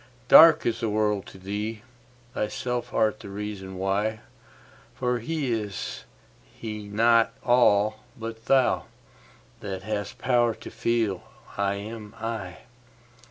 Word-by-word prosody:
Dark 160 -1 +9
is 115 -1 0
the 115 -2 -1
world 105 -1 0
to - - -12
thee: 105 +3 -4 0.5
thyself 120 +3 -3
art 110 0 +1
the - - -10
reason 100 -1 -6
why; 100 +3 -1 0.7
For 125 -1 0
is 115 - -3 0.4
He 105 -2 -8
not 115 +2 +3
all 110 -3 +4 0.2
but 115 0 -7
thou, 135 -2 +3 0.7
that 95 -2 -5
hast 105 -1 -4
power 120 -3 +2
to - - -10
feel 110 -6 0 0.3
'I 100 0 0
am 105 +1 -8
I'? 105 -7 -4
110 Hz, 115 wpm, -26 LUFS, 100-115 Hz, 0.7 s, Dark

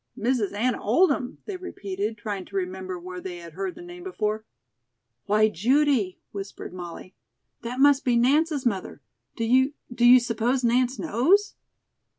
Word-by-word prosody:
"Mrs. 230 -4 0
Anna 235 +4 0
Oldham?" 260 - +2
they 400 -3 -5
repeated, 210 - -4
trying 205 -2 -4
to 195 - -13
remember 185 -1 -3
where 180 +1 -8
they 180 -1 -6
had 170 -2 -11
heard 190 +1 -4
the - - -10
name 350 0 -10
before. 220 - -2 0.8
"Why, 215 +1 +4
Judy," 235 - +1
whispered 195 -2 -7
Molly, 175 0 -8 0.5
"that 240 +2 -5
must 280 0 +5
be 245 -2 +2
Nance's 285 +4 +2
mother. 195 -6 -2 0.3
Do 230 - -3
you 260 +5 +3 0.2
do 240 0 -1
you 245 +1 +9
suppose 240 +2 0
Nance 250 +2 +2
knows?" 350 - +2
235 Hz, 155 wpm, -25 LUFS, 195-265 Hz, 0.8 s, you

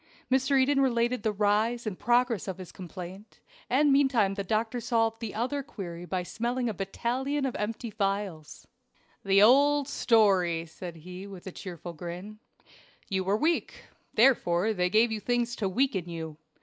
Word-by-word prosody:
Mr. 265 +1 +3
Eden 275 +1 +3
related 240 -2 +1
the 220 -1 0
rise 215 +4 +1
and 205 -4 -4
progress 240 -1 +2
of 190 -2 -4
his 185 -2 -9
complaint, 185 +3 -9 0.3
and 280 +2 +4
meantime 260 -8 +3
the 200 0 -3
doctor 220 +4 -1
solved 225 -1 +1
the 225 -3 -5
other 260 +6 -1
query 175 -9 -7
by 180 0 -2
smelling 240 +6 -2
a 225 - -1
battalion 250 +9 -2
of 260 - -2
empty 220 +2 -4
phials. 195 -6 -3 0.6
"The 195 +1 +5
old 285 +4 +5
story," 190 - +3
said 170 +1 -9
he 180 +4 -9
with 190 -3 -11
a 190 - -6
cheerful 175 -2 -8
grin. 180 +6 -8 0.7
"You 190 -2 0
were 195 +3 +1
weak 320 +6 0 0.4
therefore 220 -5 +3
they 180 -2 +1
gave 220 +4 +4
you 220 - -2
things 240 +2 0
to 195 - -1
weaken 195 -5 0
you. 160 -2 -6
215 Hz, 160 wpm, -28 LUFS, 185-245 Hz, 0.7 s, The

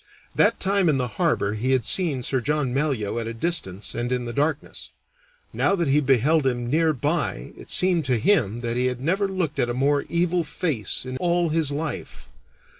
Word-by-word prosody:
That - - +2
time 195 -2 +2
in 145 - +2
the 125 -1 -1
harbor 100 +1 +1
he 125 +5 0
had 125 -4 +1
seen 155 -9 +2
Sir 130 0 0
John 145 -1 -1
Malyoe 130 -7 -1
at 115 - -4
a 115 - -5
distance 115 - -1
and 120 +1 -3
in 125 -1 -1
the 120 - -5
darkness; 150 +3 -2 0.6
now 195 - +2
that 170 -4 -1
he 145 +2 +4
beheld 140 +3 +2
him 120 -1 -2
near 160 +1 +3
by 150 - -2
it - - -13
seemed 180 -3 +4
to 125 -2 +1
him 120 - +1
that 120 0 -2
he 125 +1 +1
had 125 -1 -3
never 185 +9 0
looked 185 -6 -3
at 120 - +1
a 120 - -2
more 140 +2 +2
evil 175 0 +1
face 145 - -2
in 130 0 -5
all 175 0 +1
his 160 -2 +1
life. 150 +3 -6
140 Hz, 200 wpm, -23 LUFS, 120-165 Hz, 0.6 s, he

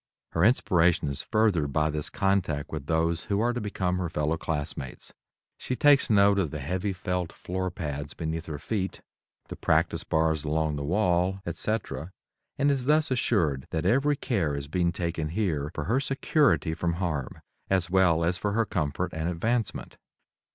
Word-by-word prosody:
Her 80 - +1
inspiration 90 - +3
is 70 - -4
furthered 95 -10 +1
by 80 0 +2
this 75 0 -2
contact 95 -7 0
with 75 -3 -5
those 80 +1 0
who 100 0 0
are 120 +2 +2
to 120 - -3
become 90 -3 -1
her 90 -2 -2
fellow 75 0 0
classmates. 75 -5 -5 0.5
She 130 - -3
takes 145 0 +5
note 100 -1 +5
of 90 -6 0
the 75 - -5
heavy 90 +8 -2
felt 90 -2 -3
floor 95 +1 -3
pads 75 -5 -5
beneath 80 0 -4
her 75 -2 -4
feet, 95 +4 -3 0.5
the - - -5
practice - - +1
bars 80 -1 +1
along 80 0 0
the 70 - -4
wall, 90 +2 +1
etc., 110 -8 -3 0.5
and 145 +1 +3
is 135 -3 -1
thus 150 0 +3
assured 85 - +1
that 80 -1 -2
every 140 +4 +3
care 95 - -1
is 70 0 -5
being 85 +2 +1
taken 85 -3 -3
here 80 -6 -1
for 75 - -2
her 115 - +1
security 135 - +2
from 85 +1 -1
harm 85 -7 -3 0.3
as 90 -2 +1
well 90 -3 +4
as 90 +1 0
for 105 +2 -1
her 115 +1 +2
comfort 90 0 -2
and 80 +2 -2
advancement. 110 +6 -2
90 Hz, 170 wpm, -27 LUFS, 80-100 Hz, 0.5 s, takes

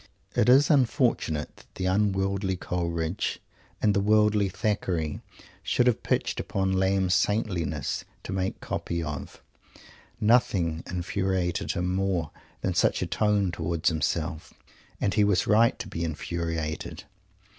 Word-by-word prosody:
It - - +3
is 135 +5 +6
unfortunate 125 - +1
that - - -20
the 95 - -3
unworldly 95 0 +1
Coleridge 85 0 -2 0.4
and 105 - +4
the 100 - +2
worldly 105 0 +3
Thackeray 90 -5 -1 0.4
should 125 - +1
have 125 -3 +3
both - - -33
pitched - - 0
upon 95 -1 -1
Lamb's 95 -1 +2
"saintliness" 95 -3 0 0.2
to - - -5
make 95 0 -2
copy 85 -1 -3
of. 75 -2 -6 0.8
Nothing 100 -8 +2
infuriated 90 0 -1
him 90 +1 -1
more 95 -5 0 0.3
than - - 0
such - - +2
a - - 0
tone 105 -3 +1
towards 85 0 0
himself. 80 0 -2 0.4
And 100 - 0
he 105 - +4
was 100 -3 +2
right 115 +2 +4
to - - -6
be 85 - -4
infuriated. 80 -1 -3
95 Hz, 135 wpm, -27 LUFS, 85-105 Hz, 0.8 s, is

